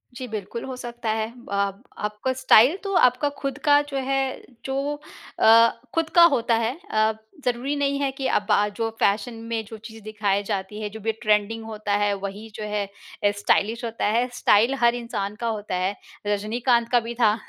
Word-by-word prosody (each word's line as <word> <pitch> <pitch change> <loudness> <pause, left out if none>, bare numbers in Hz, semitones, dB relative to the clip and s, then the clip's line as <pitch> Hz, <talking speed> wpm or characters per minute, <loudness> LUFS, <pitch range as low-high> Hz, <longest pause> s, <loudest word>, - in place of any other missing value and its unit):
जी, 255 +1 -6
बिल्कुल 220 +1 -5
हो 260 - -5
सकता 240 -2 -5
है। 220 0 -1 0.2
अब 200 +2 -1
आपका 210 +5 -2
स्टाइल 260 - +5
तो 395 -1 -3
आपका 250 0 +4
खुद 275 -1 -3
का 290 0 +6
जो 275 - -3
है, 270 0 +2 0.4
जो 275 +2 -2 0.4
अ, 230 +1 +7 0.3
खुद 330 -1 +1
का 345 - +9
होता 235 -1 +1
है। 230 +4 -1
अ, 215 0 +3 0.3
ज़रूरी 250 +3 0
नहीं 280 -1 0
है 275 -1 +1
कि 270 0 -3
अब 205 - 0
आज 210 0 +3
जो 225 0 -1
फ़ैशन 205 +4 +1 0.2
में 225 -1 -1
जो 220 +1 -9
चीज़ 220 +1 -11
दिखाई 205 -2 -1
जाती 200 0 -4
है 210 - -3
जो 220 +2 -9
भी 225 +1 -1
ट्रेंडिंग 215 +1 +1
होता 215 -2 -3
है 205 0 +2
वही 200 +3 -7
जो 215 - -5
है 210 -1 -2 0.4
अ, 205 - +4
स्टाइलिश 215 +3 +1
होता 230 0 -3
है। 230 +4 +2
स्टाइल 235 +1 +4
हर 235 0 +5
इंसान 225 -4 -4
का 235 - -1
होता 210 -4 -3
है। 185 +2 -1 0.3
रजनीकांत 230 +3 +1
का 245 - +5
भी 235 0 -6
था 220 -3 +3
225 Hz, 195 wpm, -24 LUFS, 210-250 Hz, 0.4 s, का